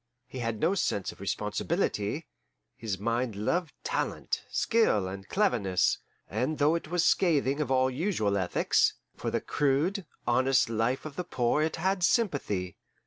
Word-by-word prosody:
He 130 0 -8
had 115 -2 -2
no 165 +4 +2
sense 105 - -1
of - - -17
responsibility; - - -1 0.5
his 105 -4 -3
mind 115 +2 -1
loved 160 - -1
talent, - - -2
skill, 220 - +2
and 95 +1 -7
cleverness, 100 - +2 0.3
and 130 +9 -1
though 150 +2 +4
it 165 -2 -2
was 175 +1 +1
scathing 145 -6 +3
of 145 - -2
all 130 0 +3
usual 130 - 0
ethics, 95 -3 +2 0.2
for - - -3
the - - -1
crude, 150 +8 0 0.2
honest 130 0 +3
life 115 +5 0
of 150 -2 -8
the 180 - -1
poor 125 -1 +1
it 155 +1 0
had 190 +3 0
sympathy. 140 - 0
130 Hz, 150 wpm, -29 LUFS, 110-165 Hz, 0.5 s, though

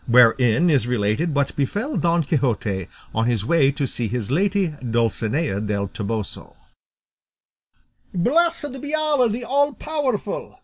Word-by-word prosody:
WHEREIN 125 +5 +5
IS 135 -6 +2
RELATED 125 +7 0
WHAT 140 -1 0
BEFELL 205 - -2
DON 170 -1 +2
QUIXOTE 115 - -1 0.3
ON 115 +1 +1
HIS 115 -4 0
WAY 145 0 +4
TO 140 0 -2
SEE 120 -3 -2
HIS 120 0 -3
LADY 195 +3 +1
DULCINEA 115 +2 0
DEL 100 -2 -2
TOBOSO 105 -1 -5 1.6
"Blessed 290 - +1
be 290 +1 -2
Allah 300 -6 +2
the 235 +3 -3
all 285 +3 +1
powerful!" 275 -5 -3
140 Hz, 130 wpm, -22 LUFS, -, 1.6 s, WHEREIN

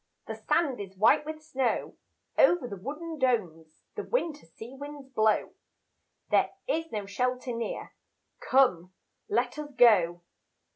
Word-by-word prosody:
The - - -5
sand 295 -7 0
is 195 -1 -8
white 220 +8 +4
with 310 0 -6
snow, 265 -6 -1 0.4
Over 350 - +4
the 200 - -6
wooden 305 - -6
domes 175 - -1
The - - -4
winter 325 - -2
sea 225 +9 -11
winds 285 0 -9
blow 220 -4 +2 0.8
There - - +4 0.2
is 325 -8 -1
no 210 -2 -3
shelter 250 +4 -2
near, 230 -1 -5 0.5
Come, 185 -9 +2 0.3
let 245 +4 0
us 300 -1 -5
go. 175 -7 +5
250 Hz, 135 wpm, -28 LUFS, 205-295 Hz, 0.8 s, go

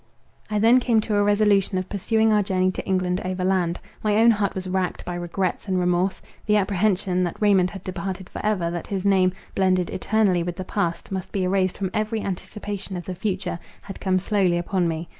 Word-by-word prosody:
I 210 - 0
then 230 +4 +6
came 235 -3 +2
to 215 - -3
a 205 - +3
resolution 205 -2 +3
of 185 0 -2
pursuing 220 +2 +1
our 210 - +4
journey 185 -2 +1
to - - -5
England 185 -1 0
overland. 185 -1 0 0.2
My 210 -1 +2
own 230 +1 +6
heart 205 -3 0
was 185 0 -4
racked 185 0 -2
by 175 - -4
regrets 175 +3 -2
and 185 -1 +1
remorse. 180 +1 0 0.2
The 210 0 +4
apprehension, 190 -2 +1
that 175 - -3
Raymond 195 -4 +4
had 195 -1 -9
departed 185 0 -5
for - - -7
ever, 190 -6 0
that 175 -1 -5
his 195 -1 -3
name, 190 -2 +4 0.2
blended 185 -2 +1
eternally 200 -3 +1
with 175 0 -3
the 185 - -5
past, 175 -3 -2
must 190 -2 -4
be 195 - -1
erased 185 0 +1
from 190 -2 -2
every 215 0 -1
anticipation 200 0 -5
of 175 - -7
the 185 - -4
future, 185 -2 -3 0.2
had 195 - -9
come 185 -1 +2
slowly 185 -2 +1
upon 175 +1 0
me. 165 0 -3
190 Hz, 205 wpm, -24 LUFS, 180-205 Hz, 0.2 s, then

